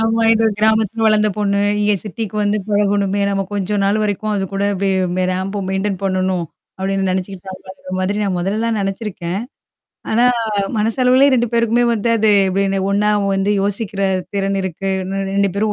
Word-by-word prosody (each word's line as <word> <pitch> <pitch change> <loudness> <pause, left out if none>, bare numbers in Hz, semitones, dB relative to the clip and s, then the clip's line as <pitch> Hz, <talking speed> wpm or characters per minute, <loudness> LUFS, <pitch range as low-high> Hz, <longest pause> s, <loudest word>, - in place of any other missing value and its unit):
ஆமா. 225 +1 +1
"இது 225 - +2
கிராமத்தில 220 +1 +2
வளந்த 215 0 +3
பொண்ணு, 200 -1 +1 0.2
இங்க 210 0 +2
சிட்டிக்கு 215 +1 -5
வந்து 205 +1 +1
பழகணுமே! 205 -1 +1
நம்ம 195 0 0
கொஞ்ச 205 +1 -1
நாள் 205 +2 +2
வரைக்கும் 210 +1 -1
அது 195 - -1
கூட 195 +1 -1
இப்டியே 195 0 0
அப்டியே 180 +1 -1
ரேம்ப்ப 195 +2 -3
மெயின்டெயின் 190 0 -1
பண்ணணும்." 185 -2 0 0.3
அப்டின்னு 195 0 -1
நெனச்சுக்கிட்டாங்களோங்குற 190 0 -6
மாதிரி 190 +2 -1
நான், 195 -3 -1
மொதல்லல்லாம் 215 +4 -1
நெனச்சிருக்கேன். 195 -2 -3 0.7
ஆனா 235 +2 +3 0.5
மனசளவுலயே 255 +5 +3
2 240 -1 +1
பேருக்குமே 235 +1 +2
வந்து 225 0 -1
அது 220 0 +3 0.2
எப்டின்னு 195 +1 0
ஒண்ணா 210 +1 +2 0.2
வந்து 195 +2 +1
யோசிக்கிற 200 0 -1 0.3
திறன் 195 0 -1
இருக்கு. 190 +1 -3
இன்னும் 195 +1 -3
2 200 0 +2
பேரும் 210 +1 0
200 Hz, 155 wpm, -18 LUFS, 195-215 Hz, 0.7 s, வளந்த